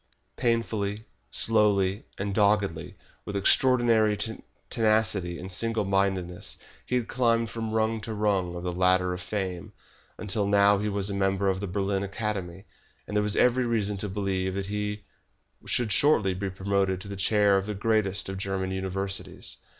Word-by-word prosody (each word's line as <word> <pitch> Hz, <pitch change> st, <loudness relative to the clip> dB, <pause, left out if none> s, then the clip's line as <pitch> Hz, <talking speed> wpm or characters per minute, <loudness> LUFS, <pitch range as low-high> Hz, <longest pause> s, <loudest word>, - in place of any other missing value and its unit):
Painfully, 110 Hz, -3 st, -1 dB, 0.2 s
slowly, 105 Hz, -3 st, +2 dB
and 100 Hz, 0 st, -2 dB
doggedly, 100 Hz, -5 st, +1 dB, 0.3 s
with 105 Hz, -, -6 dB
extraordinary 115 Hz, 0 st, +3 dB, 0.5 s
tenacity 110 Hz, -6 st, +1 dB
and 95 Hz, +2 st, -7 dB
single 115 Hz, +2 st, 0 dB
mindedness, 95 Hz, -2 st, -1 dB, 0.3 s
he 125 Hz, -, -2 dB
had 125 Hz, -2 st, 0 dB
climbed 115 Hz, -3 st, +1 dB
from 115 Hz, 0 st, -4 dB
rung 110 Hz, 0 st, 0 dB
to 110 Hz, +1 st, -5 dB
rung 100 Hz, -4 st, 0 dB
of 85 Hz, -, -6 dB
the 90 Hz, -1 st, -2 dB
ladder 90 Hz, 0 st, +3 dB
of 90 Hz, -, -6 dB
fame, 95 Hz, -3 st, -4 dB, 0.4 s
until 105 Hz, 0 st, -1 dB
now 100 Hz, 0 st, +4 dB
he 105 Hz, +1 st, -1 dB
was 100 Hz, 0 st, 0 dB
a -, -, -3 dB
member 95 Hz, 0 st, +1 dB
of 95 Hz, 0 st, -1 dB
the 100 Hz, -, -4 dB
Berlin 95 Hz, +1 st, -1 dB
Academy, 100 Hz, -2 st, -4 dB, 0.4 s
and 105 Hz, -, -6 dB
there 105 Hz, -, +3 dB
was 105 Hz, 0 st, +1 dB
every 125 Hz, 0 st, +3 dB
reason 105 Hz, -3 st, 0 dB
to 105 Hz, +1 st, -2 dB
believe 95 Hz, -1 st, -2 dB
that 100 Hz, 0 st, -2 dB
he 105 Hz, +1 st, -3 dB, 0.6 s
would 120 Hz, -4 st, 0 dB
shortly 105 Hz, -4 st, +3 dB
be 95 Hz, +2 st, -3 dB
promoted 95 Hz, 0 st, 0 dB
to 95 Hz, -, -8 dB
the 100 Hz, -, -6 dB
Chair 100 Hz, +1 st, +3 dB
of 95 Hz, +1 st, 0 dB
the 105 Hz, -, -3 dB
greatest 105 Hz, -2 st, +1 dB
of 95 Hz, 0 st, -5 dB
German 95 Hz, -1 st, -2 dB
Universities. 95 Hz, +1 st, -3 dB
100 Hz, 165 wpm, -27 LUFS, 95-110 Hz, 0.6 s, now